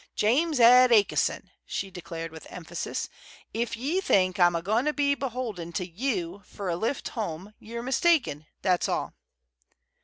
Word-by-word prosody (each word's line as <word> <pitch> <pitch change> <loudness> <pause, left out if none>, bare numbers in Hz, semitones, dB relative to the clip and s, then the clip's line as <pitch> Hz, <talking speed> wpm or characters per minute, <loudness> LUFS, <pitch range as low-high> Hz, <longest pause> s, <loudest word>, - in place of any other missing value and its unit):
"James 285 +7 +2
Ed 250 +2 +8
A'ki'son," 210 -3 +2
she 195 -1 -4
declared, 165 -2 -7
with 160 0 -11
emphasis, 175 -1 -5 0.5
"if 235 0 -2
ye 300 +11 -1
think 185 - +2
I'm 175 -1 +5
a 170 - -1
goin' 220 +7 +1
to 300 - +1
be 285 -1 +2
beholden 240 -11 -4
to 180 - -2
you 190 -2 -3
fer 195 +1 -6
a 170 - 0
lift 225 +10 -2
home, 205 - -5
ye're 235 +2 -7
mistaken, 260 - +1 0.2
that's 180 -2 +2
all." - - -2
215 Hz, 155 wpm, -27 LUFS, 175-255 Hz, 0.5 s, Ed